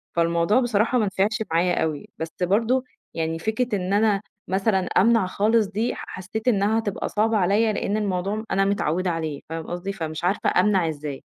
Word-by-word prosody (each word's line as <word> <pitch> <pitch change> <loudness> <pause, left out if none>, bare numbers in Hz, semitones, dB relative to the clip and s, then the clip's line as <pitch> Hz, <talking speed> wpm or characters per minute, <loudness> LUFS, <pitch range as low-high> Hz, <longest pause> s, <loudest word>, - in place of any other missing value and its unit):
فالموضوع 170 +6 +2
بصراحة 240 0 +1
ما 220 - +2
نفعش 205 +3 0
معايا 175 +2 +2
أوي، 155 -3 -3
بس 160 - -4
برضه 225 +8 +2 0.3
يعني 165 0 -2
فكرة 220 +4 -1
إن 185 +1 -2
أنا 205 -1 +3 0.3
مثلًا 195 +1 +1
أمنع 195 +3 +3
خالص 215 +3 +2
دي، 215 +5 -1
حسّيت 205 +5 -6
إنها 215 -1 +3
هتبقى 205 -3 -3
صعبة 220 +1 +1
عليَّ، 210 +4 +2
لإن 205 +1 -1
الموضوع 200 +1 -1
أنا 195 0 +2
متعوّدة 185 -2 0
عليه، 160 -3 -3
فاهم 160 0 -5
قصدي؟ 175 +3 -4
فمش 160 -3 -5
عارفة 185 +3 +1
أمنع 190 -6 +3
إزاي، 145 -2 -6
195 Hz, 170 wpm, -24 LUFS, 175-215 Hz, 0.3 s, أنا